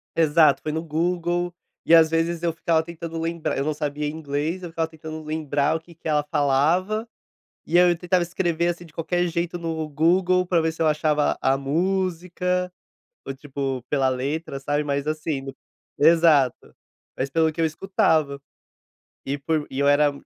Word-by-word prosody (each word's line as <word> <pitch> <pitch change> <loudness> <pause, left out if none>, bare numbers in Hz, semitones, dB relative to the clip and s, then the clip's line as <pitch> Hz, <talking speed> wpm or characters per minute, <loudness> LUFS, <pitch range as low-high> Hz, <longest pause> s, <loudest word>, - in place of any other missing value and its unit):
Exato, 155 -3 +4
foi 155 - -3
no 160 +1 -3
Google. 175 +2 -1 0.3
E, 165 - +7
às 160 -1 +6
vezes, 165 +1 -1
eu 170 -2 +1
ficava 165 -1 +1
tentando 165 0 -7
lembrar, 165 0 -2
eu 135 - 0
não 155 - -1
sabia 150 0 -3
inglês, 155 +3 -3
eu 175 - -6
ficava 165 0 -2
tentando 160 -1 -9
lembrar 150 -1 0
o - - -1
que 165 +1 -18
que 165 - -9
ela 150 -1 +2
falava, 155 - +1 0.6
e 175 - +2
aí 180 0 +6
eu 175 - +1
tentava 180 +1 +1
escrever, 170 -1 0
assim, 175 0 -4
de 155 - -18
qualquer 175 +2 -1
jeito, 170 +1 -2
no 160 -2 -3
Google 180 +4 +2
pra 175 -2 +2
ver 160 0 0
se 165 - -8
eu 160 - +4
achava 150 -1 +1
a 135 0 +2
música 180 +3 -1 0.5
ou, 135 - -4
tipo, 135 -2 -4
pela 135 -2 +2
letra, 135 +3 -3
sabe, 145 +2 -1
mas, 140 0 -2
assim, 155 -2 -2
no 135 0 -8 0.4
Exato, 155 -4 +4 0.4
mais 130 - -2
pelo 160 +1 +2
que - - -22
eu - - +3
escutava 155 -4 +1 0.9
e 140 +2 -2
por 155 +1 -1
e 135 - -6
eu 140 - +2
era 145 0 +4
160 Hz, 180 wpm, -24 LUFS, 145-170 Hz, 0.9 s, E